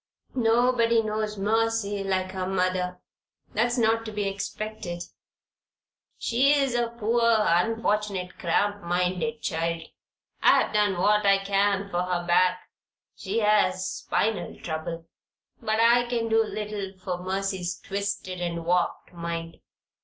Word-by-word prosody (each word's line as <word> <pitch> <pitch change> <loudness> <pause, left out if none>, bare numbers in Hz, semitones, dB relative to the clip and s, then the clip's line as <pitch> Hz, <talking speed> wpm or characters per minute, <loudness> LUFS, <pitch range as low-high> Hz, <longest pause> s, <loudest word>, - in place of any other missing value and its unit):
"Nobody 235 -1 +3
knows 215 0 -2
Mercy 215 -1 0
like 185 -1 -1
her 185 -1 -3
mother. 185 -1 -1 0.5
That's 240 +4 +1
not 225 -1 +2
to 220 - -5
be 205 -1 -2
expected. 200 -2 -5 1.1
She's 275 +2 +2
a 240 -1 +1
poor, 235 0 -1
unfortunate, 210 -2 +1
cramp 205 +4 +1
minded 180 +6 -1
child. 165 -1 -1 0.6
I've - - +4
done 205 -3 +2
what 210 +3 +3
I 195 0 +6
can 200 0 +1
for 175 - 0
her 180 -1 -2
back 180 +1 +3 0.5
she 215 +4 -2
has 195 -3 +3
spinal 220 +3 -2
trouble; 165 0 -5 0.6
but 220 +1 0
I 240 +1 +5
can 230 -2 -1
do 225 0 +4
little 210 -3 -5
for 185 -1 -4
Mercy's 190 -1 -2
twisted 200 -2 -4
and 170 -1 -3
warped 180 +1 0
mind. 170 -1 -5
200 Hz, 125 wpm, -26 LUFS, 180-225 Hz, 1.1 s, I